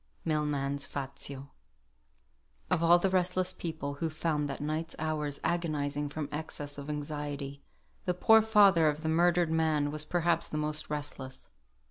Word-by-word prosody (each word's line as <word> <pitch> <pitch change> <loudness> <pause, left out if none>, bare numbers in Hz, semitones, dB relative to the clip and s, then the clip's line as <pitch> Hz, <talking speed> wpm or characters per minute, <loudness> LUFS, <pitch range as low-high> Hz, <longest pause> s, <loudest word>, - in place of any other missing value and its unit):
MILMAN'S 145 -3 -1
"FAZIO." 140 0 -6 1.2
Of 180 -3 +2
all 170 +1 +7
the 185 +2 +1
restless 185 0 +1
people 160 -5 -4
who 165 - +1
found 150 -2 -1
that 135 - -4
night's 155 +2 -3
hours 150 -2 -2
agonising 150 -4 -1
from 150 0 -4
excess 145 -1 -4
of 140 +1 -7
anxiety, 145 -1 -4 0.4
the 180 - 0
poor 220 +4 +6
father 200 -7 +5
of 150 +1 -1
the 160 - 0
murdered 175 0 +3
man 155 -3 +1
was 150 0 +1
perhaps 170 0 +1
the 155 - -3
most 150 0 -1
restless. 145 -3 -5
155 Hz, 145 wpm, -30 LUFS, 145-170 Hz, 1.2 s, all